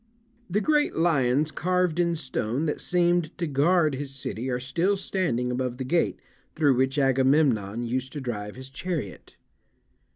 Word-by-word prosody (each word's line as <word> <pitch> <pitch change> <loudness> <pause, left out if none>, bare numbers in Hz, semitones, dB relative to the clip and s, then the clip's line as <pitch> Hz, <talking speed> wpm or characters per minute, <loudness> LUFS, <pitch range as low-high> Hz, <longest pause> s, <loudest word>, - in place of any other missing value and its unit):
The 205 +4 +1
great 300 +1 +2
lions 150 -3 +2
carved 180 -1 0
in 170 -1 +2
stone 135 -2 -2
that 150 - -2
seemed 175 -2 +1
to 175 - -1
guard 155 +2 +2
his 140 +1 -4
city 130 -2 -4
are 125 -1 -1
still 165 +10 0
standing 130 -11 -1
above 125 -1 -2
the 130 - -3
gate 165 +6 0 0.4
through 145 -4 +4
which 130 +2 +1
Agamemnon 130 -5 +2
used 130 +2 -2
to 150 - -4
drive 105 -6 -5
his 130 +1 -10
chariot. 150 - -5
140 Hz, 155 wpm, -26 LUFS, 130-170 Hz, 0.4 s, through